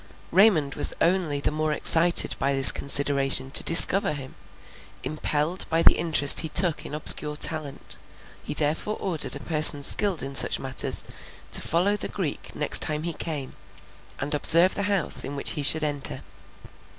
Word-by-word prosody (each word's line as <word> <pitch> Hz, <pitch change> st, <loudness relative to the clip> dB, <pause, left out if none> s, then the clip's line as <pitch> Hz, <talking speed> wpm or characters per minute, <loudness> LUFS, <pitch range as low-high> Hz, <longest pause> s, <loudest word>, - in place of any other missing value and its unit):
Raymond 170 Hz, -7 st, +1 dB
was -, -, +2 dB
only 170 Hz, -5 st, -2 dB
the -, -, -3 dB
more 155 Hz, 0 st, -4 dB
excited 170 Hz, +3 st, +2 dB
by 140 Hz, +1 st, -2 dB
this 135 Hz, 0 st, +7 dB
consideration 140 Hz, -1 st, -1 dB
to -, -, +1 dB
discover 180 Hz, +2 st, +5 dB
him; 135 Hz, -3 st, -11 dB, 0.7 s
impelled 155 Hz, +3 st, -4 dB
by 165 Hz, 0 st, -1 dB
the -, -, +5 dB
interest 155 Hz, -4 st, +2 dB
he 160 Hz, -, -3 dB
took 170 Hz, 0 st, 0 dB
in 150 Hz, -, -9 dB
obscure 150 Hz, 0 st, +3 dB
talent, 150 Hz, -2 st, -4 dB, 0.4 s
he -, -, -7 dB
therefore 155 Hz, +8 st, -4 dB
ordered 170 Hz, -6 st, -2 dB
a -, -, -9 dB
person 150 Hz, -3 st, +3 dB
skilled 195 Hz, +2 st, +2 dB
in 135 Hz, 0 st, -7 dB
such -, -, +4 dB
matters, 135 Hz, -1 st, -2 dB, 0.5 s
to -, -, +1 dB
follow 180 Hz, +5 st, -2 dB
the -, -, -8 dB
Greek 175 Hz, -8 st, -8 dB
the -, -, -16 dB
next 150 Hz, -, +4 dB
time 150 Hz, 0 st, -3 dB
he 170 Hz, 0 st, -4 dB
came, 150 Hz, -5 st, -7 dB, 0.6 s
and 145 Hz, +2 st, -5 dB
observe 170 Hz, +5 st, +3 dB
the -, -, -5 dB
house 195 Hz, -6 st, -1 dB
in 140 Hz, -, -8 dB
which 140 Hz, -, -5 dB
he 150 Hz, -, -6 dB
should 155 Hz, +2 st, -2 dB
enter. 145 Hz, -2 st, -4 dB
155 Hz, 170 wpm, -22 LUFS, 145-170 Hz, 0.7 s, this